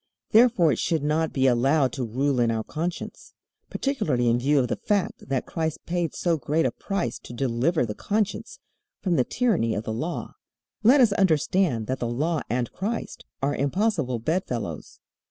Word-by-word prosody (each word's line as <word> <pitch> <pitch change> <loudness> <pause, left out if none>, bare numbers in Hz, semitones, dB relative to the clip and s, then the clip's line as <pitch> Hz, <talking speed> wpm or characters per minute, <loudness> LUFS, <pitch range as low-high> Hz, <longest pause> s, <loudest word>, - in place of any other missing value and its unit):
Therefore 220 -8 +5
it 120 - -1
should 160 -4 0
not 155 +2 +1
be 135 -1 +1
allowed 130 +2 +3
to 130 -1 -3
rule 130 +3 0
in 120 -1 +3
our 110 -1 -1
conscience, 170 +7 -5 0.3
particularly 145 - 0
in 120 +1 +2
view 145 +4 +2
of 130 -2 +3
the - - -1
fact 200 -9 -2
that 135 -2 -1
Christ 160 -2 -3
paid 175 -3 -2
so 170 -2 +1
great 150 +5 0
a - - +1
price 195 - -3
to - - -11
deliver 125 +5 +1
the 105 - -4
conscience 210 - -2 0.5
from 180 -3 +1
the 130 - +3
tyranny 175 - 0
of 105 - -3
the 110 - -3
Law. 155 +10 -4 0.5
Let 255 +5 +6
us 235 -4 +5
understand 170 - +2
that 130 +4 -3
the 120 - -1
Law 150 +7 -1
and 120 +1 -1
Christ 220 +5 -4 0.2
are 140 +1 +1
impossible 155 - 0
bedfellows. 120 - -3
145 Hz, 175 wpm, -25 LUFS, 120-180 Hz, 0.5 s, Let